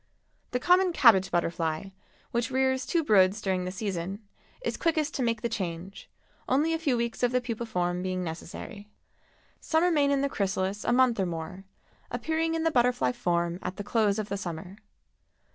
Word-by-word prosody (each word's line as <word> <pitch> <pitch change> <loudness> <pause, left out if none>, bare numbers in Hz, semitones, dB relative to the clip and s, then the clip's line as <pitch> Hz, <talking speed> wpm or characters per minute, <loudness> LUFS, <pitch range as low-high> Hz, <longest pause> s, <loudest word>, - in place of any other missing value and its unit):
The 250 - -1
common 360 +4 +4
Cabbage 210 - +6
Butterfly, 170 +1 -1 0.4
which 235 -1 0
rears 260 0 +1
two 335 -2 +1
broods 200 -4 +4
during 190 -3 -1
the 180 - -3
season, 190 -1 -4 0.5
is - - -1
quickest 315 -2 0
to - - -2
make 230 -2 0
the - - +2
change, 185 -2 -5 0.4
only 295 +5 +2
a 325 - -1
few 280 -7 +1
weeks 235 -1 -2
of 245 -1 +2
the 250 - +2
pupa 235 -2 -4
form 180 -3 -1
being 185 0 -2
necessary. 175 +5 -7 0.7
Some 320 +1 +1
remain 305 -5 +3
in 280 -1 +2
the 280 - +2
chrysalis 195 -3 -2
a - - +1
month 245 -2 +4
or 190 - +1
more, 175 +3 -6 0.4
appearing 325 +1 -1
in 325 - -1
the 325 - +2
butterfly 240 - +2
form 170 +4 -1
at 185 +1 -4
the 205 - -4
close 210 -1 +1
of 215 -1 -3
the 200 - -2
summer. 185 0 -6
210 Hz, 180 wpm, -28 LUFS, 185-260 Hz, 0.7 s, Cabbage